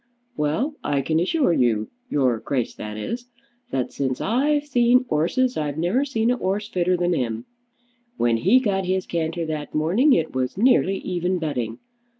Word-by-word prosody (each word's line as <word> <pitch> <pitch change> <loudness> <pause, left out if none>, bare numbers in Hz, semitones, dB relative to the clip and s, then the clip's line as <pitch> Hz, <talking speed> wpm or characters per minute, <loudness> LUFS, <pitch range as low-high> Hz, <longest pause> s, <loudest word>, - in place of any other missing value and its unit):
Well; 190 - 0
I 140 -1 0
can 160 +3 +1
assure 190 - +2
you, 110 -6 +1 0.2
your 130 -5 +1
Grace, 125 -2 -2
that 105 0 -7
is, 235 - -5 0.4
that 130 -2 -2
since 130 -2 -2
I've 290 +6 +1
seen 250 -2 +3
'orses 245 +12 +1
I've 150 -1 -2
never 180 - +1
seen 230 -4 +1
a 250 - 0
'orse 205 0 -2
fitter 180 -2 +1
than 175 0 +1
him. 115 -6 -2 0.7
When 120 -1 +2
he 195 - +4
got 195 -6 0
his 185 0 0
canter 165 0 -2
that 155 -2 -5
morning, 195 - +3
it 160 -6 0
was 130 +3 -2
nearly 200 -4 +3
even 180 0 -1
betting. 125 -9 -3
175 Hz, 165 wpm, -23 LUFS, 140-235 Hz, 0.7 s, he